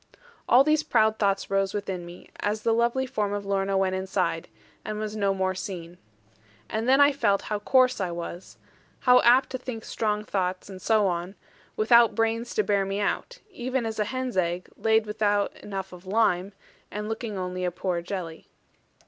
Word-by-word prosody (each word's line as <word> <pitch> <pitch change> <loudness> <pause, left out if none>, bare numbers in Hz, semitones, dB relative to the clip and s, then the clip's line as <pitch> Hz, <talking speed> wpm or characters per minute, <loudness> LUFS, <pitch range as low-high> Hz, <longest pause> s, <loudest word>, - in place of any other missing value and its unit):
All 250 +3 +7
these 305 +1 +3
proud 220 -5 +2
thoughts 195 -1 0
rose 195 0 +1
within 190 -4 -4
me 175 +1 -13
as 210 +1 -2
the 230 - +3
lovely 235 +3 +1
form 210 -5 -2
of 205 0 -3
Lorna 195 0 0
went 190 -1 +1
inside, 190 -3 -1 0.4
and 215 0 -4
was 215 0 -4
no 200 -2 +1
more 190 -1 0
seen. 180 -3 -7 0.7
And 225 +3 -1
then 270 +1 +5
I 285 0 +7
felt 215 -8 +1
how 210 -1 -2
coarse 255 +2 +3
I 185 - -1
was; 170 +1 -7 0.4
how 250 -1 +6
apt 250 +3 +5
to 260 - -3
think 245 -3 -6
strong 210 -1 -1
thoughts, 185 0 -2
and 185 -1 -9
so 215 0 +3
on; 180 +1 -2 0.4
without 235 +1 +5
brains 230 +1 -1
to 215 - +3
bear 200 -1 +1
me 195 +1 -3
out: - - -2
even 255 -6 -2
as 220 -1 -4
a 210 - +2
hen's 255 -1 -3
egg, 175 0 -1
laid 220 +1 +2
without 210 -1 0
enough 190 -2 -6
of 180 +1 -13
lime, 195 -2 +1 0.4
and 210 +1 -5
looking 220 -1 -4
only 185 0 -3
a 180 - +1
poor 175 -1 -2
jelly. 170 -3 -6
205 Hz, 185 wpm, -26 LUFS, 190-225 Hz, 0.7 s, All